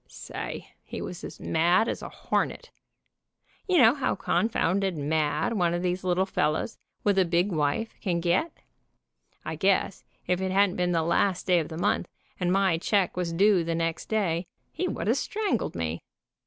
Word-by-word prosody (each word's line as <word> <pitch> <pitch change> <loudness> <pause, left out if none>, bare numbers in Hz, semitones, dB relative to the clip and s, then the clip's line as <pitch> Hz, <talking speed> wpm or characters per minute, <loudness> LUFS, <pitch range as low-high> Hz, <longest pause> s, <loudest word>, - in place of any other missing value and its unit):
Say, - - -7
he - - -7
was - - -7
mad 170 - +2
as - - -3
a - - -6
hornet. - - -2 1.0
You 370 -2 +3
know 245 -5 +7
how 275 - -1
con 220 - 0
founded 190 -4 0
mad 150 +7 0
one 175 -5 +1
of 175 - -2
these 180 +1 -1
little 185 +1 +2
fellows, 155 +3 -1 0.2
with 200 -2 +3
a - - +6
big 175 +3 +1
wife, 155 +8 0
can 175 -4 0
get. 175 - +1 0.9
I - - -3
guess - - +1 0.2
if 180 0 0
it 190 - -1
hadn't 195 -1 +3
been 180 0 +1
the 165 -2 +1
last 175 +3 +1
day 180 -2 +4
of 155 - -4
the 160 - -6
month, 175 - 0 0.3
and 180 -1 +1
my 190 -3 +2
check 195 0 +1
was 180 -2 -2
due 190 +1 +4
the 165 0 -2
next 165 0 -2
day, 180 -5 0 0.2
he 365 +3 -2
would - - -3
have - - +2
strangled 410 - -1
me. 80 -1 -3
180 Hz, 180 wpm, -27 LUFS, 165-200 Hz, 1.0 s, know